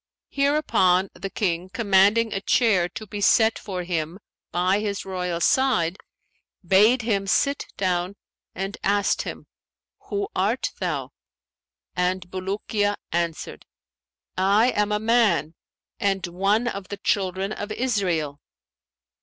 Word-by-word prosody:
Hereupon 275 -11 +2
the 195 - -6
King, 185 -3 -2
commanding 205 +1 +3
a 195 - -2
chair 195 -5 +2
to 215 +4 -8
be 205 0 -6
set 220 +2 +4
for 185 -3 -5
him 170 -1 -3 0.3
by 180 +3 +2
his 205 -1 -3
royal 180 -2 -3
side, 210 -7 +2 0.7
bade 215 +7 +4
him 200 -4 0
sit 280 +8 +1
down 185 0 -1 0.4
and 195 +2 -4
asked 200 0 +2
him - - -7 0.6
'Who 405 -1 -1
art - - 0
thou?'; - - -3 0.8
and 180 0 -1
Bulukiya 205 +2 -1 0.2
answered, 170 -1 -3 0.7
'I 205 +6 +4
am 210 0 0
a 210 - +2
man, 220 -7 +2 0.5
and 195 -2 0
one 195 +7 +1
of 200 -5 -4
the 205 - -6
Children 195 0 -1
of 210 0 -5
Israel.' 180 - -1
195 Hz, 120 wpm, -24 LUFS, 180-215 Hz, 0.8 s, set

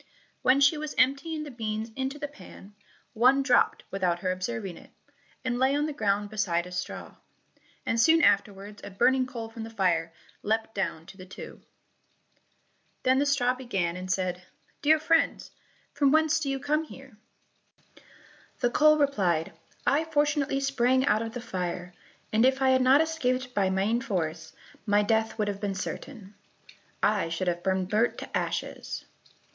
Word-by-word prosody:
When 260 +2 +4
she 290 +2 +4
was 305 -1 -5
emptying 280 +4 +1
the 295 - -8
beans 220 -1 -4
into 265 +2 -3
the 295 -1 -4
pan, 245 -8 -14 0.4
one 255 +5 +4
dropped 250 -3 +3
without 185 -3 0
her 185 - 0
observing 185 -1 -4
it, - - -15 0.6
and 245 -1 -1
lay 265 +2 +3
on 295 +1 +1
the 305 - -3
ground 205 -3 0
beside 180 -5 0
a 180 - -10
straw, 175 -1 -6 0.7
and 230 0 +1
soon 325 +4 +5
afterwards 200 +1 +1
a - - -7
burning 255 +6 +2
coal 235 -3 -6
from 225 0 -9
the 225 - -6
fire 175 -6 0 0.3
leapt 220 +1 -1
down 190 -5 -3
to 195 - -13
the 185 - -10
two. 185 - -10 1.4
Then 260 +1 +3
the 285 - +1
straw 250 -3 +2
began 195 -10 -2
and 185 0 -4
said, 180 -1 -1 0.4
"Dear 310 +2 +5
friends, 325 +1 +1 0.4
from 280 -2 +3
whence 315 0 +3
do 290 -3 -2
you 275 - -1
come 305 +3 0
here?" 270 -5 -13 1.4
The 240 - +1
coal 305 +4 +5
replied, 190 - +1 0.3
"I 300 +3 +2
fortunately 295 -3 +1
sprang 260 -1 +2
out 215 -6 +2
of 225 +1 -5
the 245 - -4
fire, 180 -5 -4 0.4
and 220 +2 +4
if 265 +1 +3
I 265 -1 +3
had 260 0 +4
not 265 +4 +6
escaped 260 -6 -1
by 195 -3 +2
main 200 +5 +1
force, 160 -7 -3 0.4
my 205 0 +4
death 220 +1 0
would 210 -2 0
have 200 -1 -4
been 200 -2 -2
certain,—I 205 -3 -5
should 165 +3 -3
have 175 0 0
been 190 0 0
burnt 215 +5 +1
to - - -7
ashes." - - -3
230 Hz, 165 wpm, -27 LUFS, 195-275 Hz, 1.4 s, not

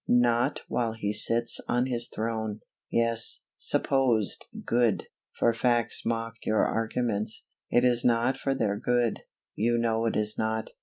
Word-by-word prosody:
not 120 -1 +2
while 115 -2 -1
He 105 -2 -3
sits 115 +2 +3
on 120 +1 +1
His 120 -2 0
throne_. 110 -1 -3 0.3
Yes, 115 -1 +1
supposed 125 -7 +1 0.2
good, 120 -3 +1 0.3
for 115 - +3
facts 120 -1 0
mock 115 0 -2
your 110 - +2
arguments. 115 -1 -2 0.2
It 120 +1 +3
is 120 -1 +3
not 120 +2 +2
for 135 - -2
their 105 -5 0
good; 120 0 0 0.3
you 120 +2 +1
know 115 -1 +1
it - - -1
is 105 0 -1
not. 110 0 -2
115 Hz, 145 wpm, -28 LUFS, 110-120 Hz, 0.3 s, sits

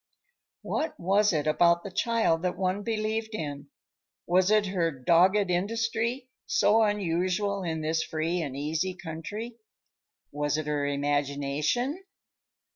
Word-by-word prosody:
What 315 0 -2
was 200 +4 +3
it 155 -4 0
about 170 +2 +3
the 200 - -7
child 205 -4 +1
that 180 0 -2
one 185 +2 0
believed 220 0 -2
in? 145 -5 -5 0.6
Was 180 +2 +3
it 215 -1 +4
her 180 -3 0
dogged 180 +8 +3
industry, 225 +6 -1 0.2
so 220 +2 +4
unusual 200 0 0
in 160 -3 -3
this 160 +1 0
free 160 +3 -2
and 140 -4 -4
easy 160 +6 -2
country? 195 +8 -7 0.7
Was 145 +1 -1
it 155 - -3
her 145 -1 -1
imagination? 145 - -1
180 Hz, 125 wpm, -28 LUFS, 155-210 Hz, 0.7 s, it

